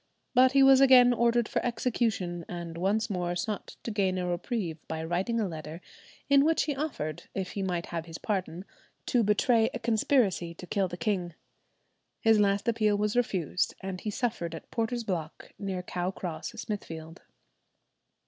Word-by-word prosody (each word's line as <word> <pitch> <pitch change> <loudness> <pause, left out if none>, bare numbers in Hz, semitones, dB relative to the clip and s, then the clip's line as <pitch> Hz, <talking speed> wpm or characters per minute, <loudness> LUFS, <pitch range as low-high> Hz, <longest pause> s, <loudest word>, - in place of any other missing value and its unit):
But 260 0 +5
he 275 -1 +6
was 270 0 +7
again 250 -2 +7
ordered 235 -1 +2
for - - -1
execution, 225 -7 -1
and 170 -2 -6
once 200 +6 +1
more 180 -3 -2
sought 210 +4 -4
to 230 - -3
gain 190 -3 +1
a 180 - -1
reprieve 175 -1 -2
by 160 0 -4
writing 185 +8 -1
a 215 - +1
letter 160 -1 -7 0.5
in 280 -1 +6
which 320 +2 +3
he 290 - -2
offered, 265 - -4
if 190 -2 -3
he 200 - -4
might 180 -3 -1
have 165 -1 -5
his 165 -1 -7
pardon, 190 -3 -3 0.4
to 245 - +2
betray 225 +2 +3
a - - -3
conspiracy 220 -7 +1
to 180 - -9
kill 195 +1 0
the 175 0 -7
king. 185 -7 -1 0.8
His 225 -1 +4
last 200 0 +2
appeal 215 -3 +2
was 210 +1 0
refused, 185 -7 0
and 190 -1 -5
he 215 - -3
suffered 210 -8 -2
at 160 - -11
Porter's 230 +1 -1
Block, 175 -6 -5
near 190 -2 -3
Cow 180 0 -2
Cross, 180 0 -5
Smithfield. 165 -8 -6
200 Hz, 170 wpm, -29 LUFS, 175-235 Hz, 0.8 s, was